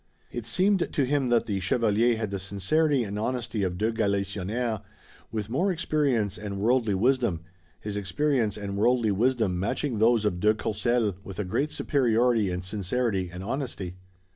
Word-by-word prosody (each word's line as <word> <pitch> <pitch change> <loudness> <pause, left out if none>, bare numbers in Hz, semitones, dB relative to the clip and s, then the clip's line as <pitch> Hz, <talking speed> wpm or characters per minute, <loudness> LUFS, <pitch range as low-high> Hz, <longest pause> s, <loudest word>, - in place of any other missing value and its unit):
It 120 -2 -5
seemed 190 - +2
to 145 -5 +1
him 135 -1 +1
that 120 -1 +3
the 100 -3 -1
chevalier 115 +4 +2
had 110 -3 -3
the 100 - -2
sincerity 125 - +1
and 105 -1 -4
honesty 120 -1 -2
of 90 -2 -1
de 110 +4 +1
Galisonnière, 105 +1 -1 0.5
with 110 -2 -3
more 170 - +1
experience 140 - 0
and 100 -2 -5
worldly 115 -1 +2
wisdom, 120 -5 +1 0.4
his 105 -1 -5
experience 105 +3 0
and 100 -1 -4
worldly 120 0 +3
wisdom 110 -3 +1
matching 115 +4 -1
those 115 -1 +4
of 90 -4 0
de 105 +3 +3
Courcelles 110 0 0
with 95 -3 -9
a 105 - -1
great 120 +11 0
superiority 120 -7 +2
in 90 0 -3
sincerity 100 0 -1
and 90 +1 -7
honesty. 115 -6 -4
110 Hz, 165 wpm, -27 LUFS, 100-125 Hz, 0.5 s, those